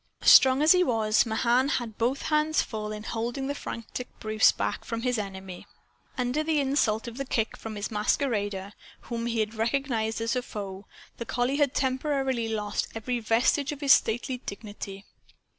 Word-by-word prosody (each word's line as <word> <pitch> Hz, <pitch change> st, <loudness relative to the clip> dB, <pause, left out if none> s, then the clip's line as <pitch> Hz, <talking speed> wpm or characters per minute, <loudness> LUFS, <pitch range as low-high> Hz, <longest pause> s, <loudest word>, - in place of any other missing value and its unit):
Strong 265 Hz, +2 st, +7 dB
as 310 Hz, -, +6 dB
he 365 Hz, 0 st, +6 dB
was, 220 Hz, -4 st, +2 dB
Mahan 240 Hz, +4 st, +2 dB
had 230 Hz, -4 st, -6 dB
both 250 Hz, +4 st, 0 dB
hands 305 Hz, 0 st, +2 dB
full 215 Hz, -1 st, -5 dB
in 210 Hz, 0 st, -6 dB
holding 235 Hz, +5 st, -3 dB
the 280 Hz, -, -1 dB
frantic 245 Hz, -2 st, -6 dB
Bruce 215 Hz, 0 st, +4 dB
back -, -, -3 dB
from 230 Hz, 0 st, -4 dB
his 250 Hz, -3 st, 0 dB
enemy. 190 Hz, -2 st, -7 dB, 0.5 s
Under 250 Hz, +4 st, 0 dB
the 310 Hz, -1 st, +1 dB
insult 265 Hz, -6 st, +1 dB
of 235 Hz, +1 st, -7 dB
the 275 Hz, -, -2 dB
kick 225 Hz, -4 st, -1 dB
from 220 Hz, -1 st, -7 dB
this 205 Hz, +2 st, -4 dB
masquerader, 210 Hz, -3 st, -1 dB, 0.3 s
whom 235 Hz, -1 st, -4 dB
he 230 Hz, -1 st, 0 dB
had 215 Hz, -, -1 dB
already 220 Hz, -, -11 dB
recognized 230 Hz, -6 st, -1 dB
as 230 Hz, +2 st, -1 dB
a 250 Hz, -, 0 dB
foe, 200 Hz, -4 st, -7 dB, 0.3 s
the 235 Hz, -, -5 dB
collie 250 Hz, +3 st, 0 dB
had 285 Hz, -3 st, +1 dB
temporarily 265 Hz, -3 st, 0 dB
lost 210 Hz, -2 st, -2 dB
every 240 Hz, +2 st, -2 dB
vestige 240 Hz, +6 st, +2 dB
of 295 Hz, 0 st, -7 dB
his 280 Hz, -2 st, +7 dB
stately 245 Hz, +3 st, +1 dB
dignity. 200 Hz, -3 st, -8 dB
235 Hz, 175 wpm, -27 LUFS, 215-270 Hz, 0.5 s, Strong